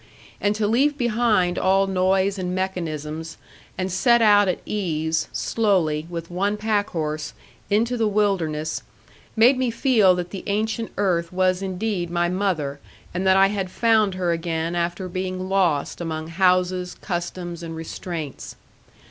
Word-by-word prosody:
And 205 +1 +1
to 215 0 0
leave 275 +7 +2
behind 220 -7 +2
all 195 +1 +3
noise 190 +1 +1
and 180 0 -2
mechanisms, 165 -4 -4 0.4
and 185 +1 -2
set 235 +6 +4
out 205 -2 +5
at 185 - +1
ease, 160 -6 -1
slowly, 170 -8 0
with 170 0 -6
one 200 +4 0
packhorse, 175 -8 -2 0.4
into 230 +4 +1
the 225 -2 +2
wilderness, 175 -7 0 0.5
made 245 +4 +5
me 255 -2 +1
feel 225 -6 +4
that 180 0 -4
the 195 - -6
ancient 220 +2 -1
earth 175 -4 0
was 185 0 +1
indeed 190 -1 -2
my 175 0 0
mother 175 -7 -1 0.3
and 185 +2 -1
that 190 0 +5
I 195 0 +5
had 195 -2 -2
found 215 -2 +2
her 180 -2 0
again 165 0 -2
after 175 +2 -2
being 185 0 -4
lost 180 -6 +1
among 160 -1 -4
houses, 180 0 +1
customs, 175 -1 -4
and 165 -1 -6
restraints. 160 -2 -6
185 Hz, 145 wpm, -23 LUFS, 170-205 Hz, 0.5 s, out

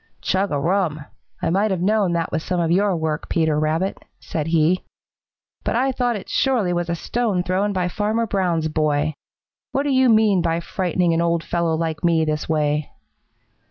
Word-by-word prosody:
"Chug 195 +1 0
a 145 - +1
rum! 165 -1 0 0.4
I - - +1
might 200 +4 +2
have 190 -3 -1
known 205 -3 +2
that 170 - +1
that - - -5
was 160 - -2
some 180 -1 -1
of 165 -1 +1
your 195 +1 +2
work, 160 -1 -3
Peter 160 -3 +1
Rabbit," 160 +5 -1 0.2
said 155 -5 -4
he, 165 +2 +2 0.8
"but - - -1
I 265 +3 +2
thought 245 -2 0
it 200 - -7
surely 235 -10 +1
was 175 0 -2
a 170 - 0
stone 210 0 -1
thrown 190 +3 0
by 185 -2 0
Farmer 215 +5 0
Brown's 180 -6 0
boy. 155 -1 0 0.6
What 275 - +1
do 285 - 0
you 260 -1 +4
mean 215 -4 +4
by 165 -1 0
frightening 175 -1 0
an 165 - +1
old 170 -1 +1
fellow 170 -2 0
like 160 0 -3
me 165 -2 +3
this 155 0 -2
way?" 150 -1 0
175 Hz, 195 wpm, -21 LUFS, 160-200 Hz, 0.8 s, you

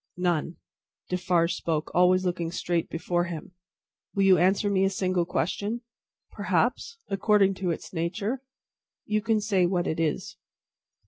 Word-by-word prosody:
"None." 175 -2 0 0.5
Defarge 180 -2 +1
spoke, 160 -2 -2
always 185 +1 +4
looking 175 -2 -1
straight 175 -2 -1
before 175 +1 -1
him. 170 -1 -7 0.6
"Will 195 - +2
you 190 -3 +6
answer 195 +4 +3
me 195 -1 +2
a 195 - +3
single 185 -2 0
question?" 205 +7 -2 0.5
"Perhaps. 465 - 0
According 195 0 +3
to 180 - 0
its 165 - -4
nature. 200 +9 -2 0.6
You 215 0 0
can 225 0 +2
say 200 -4 +2
what 175 -1 0
it 160 - -2
is." 160 -2 -2
180 Hz, 140 wpm, -27 LUFS, 170-200 Hz, 0.6 s, you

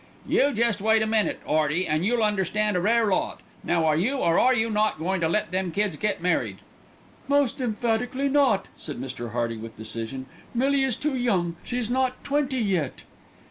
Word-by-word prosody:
"You 285 - +3
jest 230 -4 +1
wait 220 +1 +3
a - - 0
minute, 220 -1 +1
'Earty, 155 +3 +1
an' 155 +2 0
you'll 230 +3 +1
understand 210 0 +1
a 180 - +1
rare 230 +4 +3
lot. 200 - 0 0.2
Now 170 -2 +1
are 155 -1 +3
you, 210 - +1
or 170 -10 +2
are 255 - +5
you 225 -1 +1
not, 215 -2 +1
goin' 180 +3 -1
to 160 - +2
let 210 +3 0
them 185 -1 -1
kids 200 -2 0
get 205 0 -2
married?" 180 - 0 0.7
"Most 280 -2 +1
emphatically 245 +3 -1
not," 265 -8 +2
said 150 -6 -8
Mr. 125 -2 -5
Hearty 115 -1 -1
with 110 +1 -9
decision. 115 +4 -5 0.3
"Millie 275 +3 +2
is 260 -4 0
too 295 +1 -2
young; 190 -9 0
she's 245 -2 -2
not 255 0 0
twenty 280 -2 0
yet." 185 - -1
210 Hz, 185 wpm, -25 LUFS, 170-245 Hz, 0.7 s, are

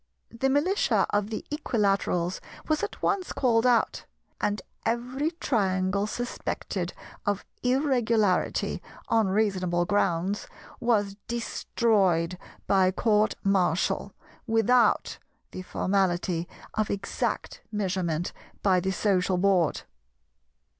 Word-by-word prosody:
The 250 +4 0
Militia 305 +9 +2
of 205 0 +1
the 220 - -5
Equilaterals 200 - 0 0.3
was 310 -1 +1
at - - -5
once 370 -2 0
called 240 -2 +3
out, 240 -2 +2 0.3
and 205 0 0 0.2
every 250 +6 -1
Triangle 195 -3 +1
suspected 245 +3 -3 0.3
of 205 -1 -1 0.2
Irregularity 245 -7 +1 0.3
on 225 -3 +3
reasonable 185 -4 +1
grounds, 195 +1 0 0.3
was 210 -5 +1
destroyed 195 -7 +1 0.3
by 190 -2 +4
Court 210 +2 +2
Martial, 185 -4 +1 0.3
without 225 +1 +3 0.3
the 185 - -6
formality 180 -2 0 0.3
of 215 -1 0
exact 200 -1 -3
measurement 185 -5 -1 0.3
by 185 -2 +4
the 190 +2 -1
Social 190 -2 +1
Board. 185 -3 +2
205 Hz, 100 wpm, -27 LUFS, 185-235 Hz, 0.3 s, by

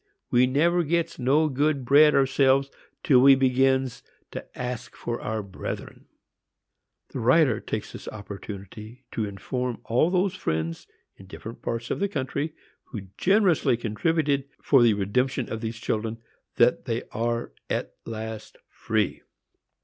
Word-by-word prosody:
we 125 +1 +5
never 170 +7 +3
gets 170 +1 -1
no 140 +5 +3
good 145 -1 0
bread 150 +4 +6
ourselves 135 0 +3 0.3
till 130 -3 +5
we 135 +1 +8
begins 130 0 +2 0.3
to - - -5 0.2
ask 125 -1 -5
for 120 0 -4
our 110 -1 -3
brethren." 95 -2 -7 1.0
The - - -5
writer - - +4
takes - - -5
this - - -9
opportunity 105 +3 -9
to 110 - -2
inform 120 +5 -4
all 125 +8 +2
those 185 +1 +1
friends, 80 +1 -3 0.3
in 95 - -14
different 115 +4 -9
parts 115 +1 -3
of - - -1
the 200 - +1
country, 145 0 -3 0.3
who 100 -6 -8
generously 190 - +3
contributed 140 +5 0 0.2
for 135 -3 +5
the 115 -3 +5
redemption 125 +6 -1
of 115 - -4
these 110 0 -4
children, 110 0 -2 0.4
that - - +3
they - - -2
are 115 +1 -2 0.2
at - - -2
last 110 -1 -7
free! 110 -3 -1
125 Hz, 140 wpm, -26 LUFS, 110-140 Hz, 1.0 s, we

